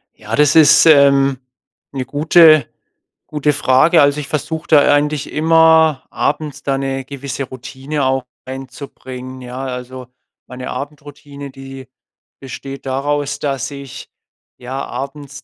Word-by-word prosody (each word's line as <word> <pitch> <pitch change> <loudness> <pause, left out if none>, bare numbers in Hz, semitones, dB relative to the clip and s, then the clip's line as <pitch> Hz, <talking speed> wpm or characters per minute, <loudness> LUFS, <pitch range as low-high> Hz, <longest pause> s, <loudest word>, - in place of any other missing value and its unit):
Ja, 110 +1 -5
das 150 +2 +3
ist, 150 0 +6
ähm, 140 -3 +5 0.5
'ne 135 -2 -4
gute 155 0 +5 0.6
gute 150 0 0
Frage. 145 +4 +3
Also, 145 +1 +2
ich 145 - -6
versuche 160 +2 -4
da 145 -2 +5
eigentlich 145 -1 -1
immer 160 -2 +3
abends 150 -1 -3
da 135 -1 -1
'ne 135 0 -3
gewisse 140 0 -6
Routine 135 +3 -5
auch 130 0 0 0.2
reinzubringen, 130 -1 -9
ja? 125 +1 -7
Also, 125 0 -7 0.4
meine 125 0 -8
Abendroutine, 145 0 -8
die 135 -1 -11 0.5
besteht 135 +1 -9
daraus, 140 +2 -2
dass 135 -2 -3
ich, 140 -2 -10 0.5
ja, 130 +2 -6
abends 140 0 -8
140 Hz, 125 wpm, -17 LUFS, 130-150 Hz, 0.6 s, ist